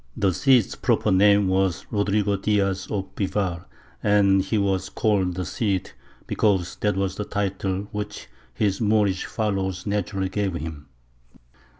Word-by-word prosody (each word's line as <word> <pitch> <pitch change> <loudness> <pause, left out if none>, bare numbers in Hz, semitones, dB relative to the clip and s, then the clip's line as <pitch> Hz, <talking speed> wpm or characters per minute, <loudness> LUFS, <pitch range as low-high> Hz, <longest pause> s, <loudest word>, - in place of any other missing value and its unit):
The 95 -2 +2
Cid's 125 -1 +3
proper - - +1
name 100 +1 +5
was 95 -1 0
Rodrigo 100 -1 +1
Diaz 95 -1 0
of 95 -2 -4
Bivar, 95 -4 -2 0.4
and 100 -2 +4
he 100 +4 -1
was 95 -2 0
called 95 -5 +1
the 90 0 -3
Cid 95 +3 -1 0.3
because 95 -5 +1
that 105 -2 0
was 95 -1 -1
the 105 - -3
title 100 -1 -2
which 105 0 -5 0.3
his 100 -1 -1
Moorish 105 -3 +2
followers 95 -4 -2
naturally 100 -2 -1
gave 95 -2 -1
him. 80 -3 -6
100 Hz, 135 wpm, -24 LUFS, 95-105 Hz, 0.4 s, name